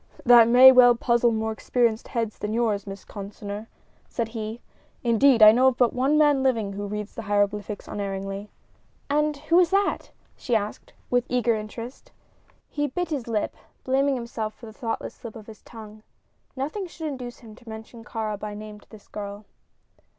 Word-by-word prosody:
"That 235 -2 +8
may 250 +2 +9
well 245 -1 +7
puzzle 235 0 +2
more 220 0 -1
experienced 230 +1 0
heads 230 -3 -3
than 210 +1 -3
yours, 215 -4 0
Miss 195 0 -8
Consinor," 205 +1 -7 0.4
said 230 -2 -3
he. 220 0 -5 0.4
"Indeed, 235 0 +5
I 215 - +11
know 255 +4 +4
of 255 -2 +2
but 245 -3 +3
one 270 +4 +2
man 295 -3 +4
living 225 -7 0
who 205 +1 -5
reads 210 +1 -5
the - - -6
hieroglyphics 205 0 -1
unerringly." 195 0 -5 0.6
"And 300 0 +1
who 335 +5 +3
is 355 - +4
that?" 395 +1 0 0.3
she 245 - -2
asked, 210 -1 -3 0.2
with 245 0 +1
eager 245 -2 +2
interest. 225 +3 -7 0.6
He 290 0 -2
bit 350 +5 -3
his 270 -6 -3
lip, 220 -3 -2 0.3
blaming 270 +1 +1
himself 230 -3 -5
for 235 - -13
the 220 - -11
thoughtless 225 0 -4
slip 230 -2 -10
of 220 -2 -10
his 215 -1 -13
tongue. 215 -2 -12 0.5
Nothing 310 +9 -4
should 330 -1 -8
induce 250 -4 -6
him 225 -3 -12
to 235 +1 -15
mention 220 +1 -10
Kāra 215 -2 -4
by 210 0 -6
name 210 0 -9
to - - -24
this 215 -2 -15
girl. 205 0 -7
230 Hz, 180 wpm, -25 LUFS, 210-255 Hz, 0.6 s, I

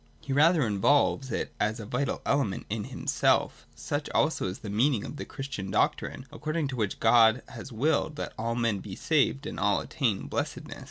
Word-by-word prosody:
He 140 - -4
rather 155 +1 +5
involves 130 +5 +2
it - - -3
as 110 +2 0
a 110 - -6
vital 125 +5 -2
element 140 -9 0
in 105 -1 -2
himself - - 0
Such 145 - -3
also 155 -10 +2
is 90 - -4
the - - -4
meaning 115 +1 +2
of 145 - -7
the - - -5
Christian 135 -8 -6
doctrine, 130 +6 0
according 155 -1 -2
to 130 - -4
which 105 -5 -2
God 115 +1 +5
has 120 +2 -9
willed 150 +5 +1
that - - -5
all 115 +1 -2
men 115 -3 +1
should - - -8
be 95 -3 -7
saved 145 -2 +1
and - - -5
all 100 0 +2
attain 115 -9 -1
blessedness. - - -4
125 Hz, 195 wpm, -28 LUFS, 105-145 Hz, -, rather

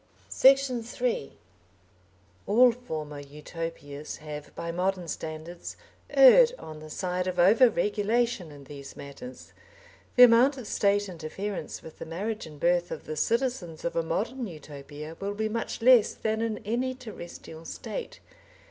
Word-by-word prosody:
Section 270 -2 +4
3 235 - -2 1.1
All 245 +4 +6
former 155 -12 -6
Utopias 150 0 -7
have, 150 -1 -8
by 170 - -4
modern 180 0 -1
standards, 160 +2 -6 0.3
erred 465 - +8
on 155 -1 -9
the 155 0 -10
side 180 +3 -2
of 180 -1 -2
over 215 +8 +6
regulation 210 -1 0
in 145 -1 -12
these 140 0 -10
matters. 145 - -10 0.6
The 250 - +9
amount 250 +4 +6
of 255 - -7
State 205 0 +1
interference 185 +3 -5
with 160 - -12
the - - -7
marriage 205 +5 -4
and 150 -2 -12
birth 175 +2 +2
of - - -6
the 155 - -5
citizens 230 - -1
of 170 - -2
a 165 - +2
modern 225 +10 -2
Utopia 150 -1 -9
will 200 +1 -3
be 220 +1 -1
much 225 +1 -4
less 250 -3 +6
than 220 0 -1
in 225 -1 -1
any 250 +4 -1
terrestrial 175 -9 -10
State. - - -6
185 Hz, 145 wpm, -28 LUFS, 155-235 Hz, 1.1 s, The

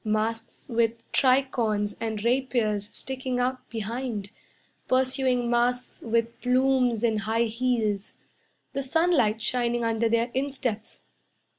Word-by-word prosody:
Masks 225 +1 -2
with 230 0 0
tricorns 240 -6 +2
and 220 -2 -3
rapiers 235 -5 0
sticking 260 -1 -4
out 255 +1 -2
behind 225 -2 -4 0.6
Pursuing 255 -1 +2
masks 245 +1 0
with 230 +1 -1
plumes 250 -2 +2
and 220 -2 +2
high 220 +3 +1
heels, 225 -3 -1 0.6
The 275 - -1
sunlight 265 -7 +2
shining 240 0 +1
under 225 0 +1
their 230 +1 +1
insteps. 260 -5 -3
235 Hz, 110 wpm, -26 LUFS, 220-255 Hz, 0.6 s, tricorns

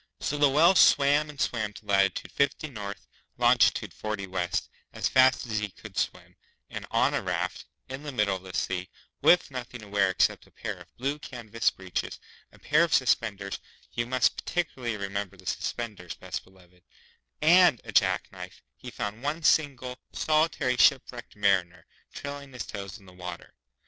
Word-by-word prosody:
So 145 - -2
the 145 -1 +6
Whale 160 +7 +6
swam 145 -3 +5
and 145 -2 -11
swam 110 -6 -1
to 105 - -13
latitude 100 -2 +1
Fifty 140 +2 0
North, 105 -7 -7 0.3
longitude - - +3
Forty 110 -2 -4
West, 90 -2 -2 0.3
as - - 0
fast 130 -1 +4
as 110 -3 -1
he 105 -1 -3
could - - -13
swim, - - -3 0.4
and - - -6
on - - +2
a - - 0
raft, - - -3 0.2
in 130 +1 -6
the 150 -1 -6
middle 105 -6 +1
of 95 - -7
the 95 -1 -9
sea, 90 -1 -2 0.3
with 180 -4 +5
nothing 125 -1 -6
to 105 - -11
wear 100 -1 +2
except 95 - +1
a - - -23
pair - - -5
of - - -16
blue 140 +4 -2
canvas 115 -4 -1
breeches, 95 -2 -5 0.3
a - - -18
pair 155 +3 +3
of 170 -4 +2
suspenders 105 -6 0 0.3
(you 120 0 -2
must 130 0 +2
particularly 130 -10 -3
remember 100 -1 -4
the 95 - -17
suspenders, 105 -3 -4
Best - - -6
Beloved), 90 -1 -22 0.6
and 170 -4 +6
a - - -8
jack - - +2
knife, - - -10
he - - -9
found 105 +2 -5
one 150 +4 -2
single, 130 -6 +1
solitary 155 -5 +1
shipwrecked 125 -2 +2
Mariner, 90 -5 +1 0.3
trailing 140 -1 -7
his 125 - -5
toes 100 -3 -7
in 100 - -19
the 90 - -15
water. 90 -1 -8
115 Hz, 175 wpm, -28 LUFS, 100-140 Hz, 0.6 s, the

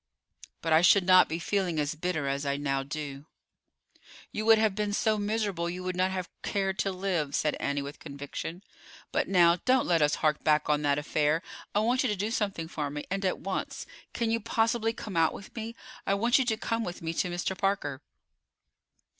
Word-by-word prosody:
"But 165 -1 +2
I 160 - +6
should 180 +1 +6
not 185 0 +7
be 160 - -2
feeling 175 -2 -1
as 145 +1 0
bitter 160 -2 -2
as 140 +1 -1
I 140 -1 -1
now 135 -1 -1
do." 140 0 -6 1.0
"You 215 +1 -3
would 225 0 +8
have 215 -2 +2
been 205 0 -2
so 215 0 +1
miserable 205 -5 -1
you 180 +1 -5
would 185 0 -2
not 185 +1 +2
have 185 -1 -3
cared 195 -1 -1
to 195 - +1
live," 180 -6 -1
said 150 - +1
Annie, 140 0 -1
with 140 +2 -8
conviction. 145 +5 -7 0.5
"But, - - 0
now, 175 -2 +5
don't 255 +6 +2
let 170 -2 +2
us 150 0 +3
hark 155 -1 0
back 150 -1 +3
on 150 0 +2
that 145 -1 +2
affair. 150 +2 +1 0.3
I 205 - +4
want 245 +4 +2
you 255 - +1
to 210 - 0
do 205 +3 -2
something 195 -7 -1
for 150 -3 -3
me, 145 +1 -5
and 195 +1 -1
at 185 - 0
once. 195 0 -4 0.3
Can 230 -1 -1
you 230 - +1
possibly 225 +1 +1
come 215 -4 -7
out 165 -1 +3
with 195 - -11
me? 230 0 -5 0.3
I 195 - +3
want 235 +6 +3
you 260 - +2
to 220 -2 0
come 230 +1 -1
with 175 -4 -6
me 165 0 -2
to 180 - 0
Mr. 175 +2 -2
Parker." 190 -9 -1
180 Hz, 210 wpm, -29 LUFS, 150-205 Hz, 1.0 s, would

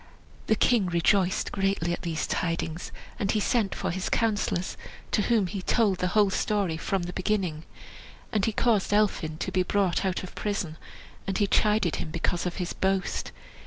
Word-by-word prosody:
The 220 - +4
king 220 -4 +3
rejoiced 180 +2 +2
greatly 195 -3 0
at - - -4
these 160 -2 -2
tidings, 165 -1 -2 0.3
and 200 - -1
he 215 - +2
sent 210 -1 +1
for - - -2
his 185 +2 -2
councillors, 205 -5 0 0.4
to - - +2
whom 220 -2 +2
he 190 +2 -4
told 200 -2 +2
the 180 - +1
whole 205 -2 +5
story 195 -4 0
from 185 +3 -1
the 175 +1 -5
beginning. 185 -5 -1 0.7
And 215 -4 +1
he 225 - +1
caused 215 -2 +2
Elphin 185 -7 +1
to - - -3
be 185 - +2
brought 185 -1 +1
out 190 -1 -1
of 185 - -8
prison, 195 -7 -3 0.5
and 195 -1 0
he 205 - +3
chided 210 -3 +2
him - - -4
because 170 +2 -1
of 175 - -3
his 180 -2 -3
boast. 190 0 -1
190 Hz, 180 wpm, -27 LUFS, 175-210 Hz, 0.7 s, whole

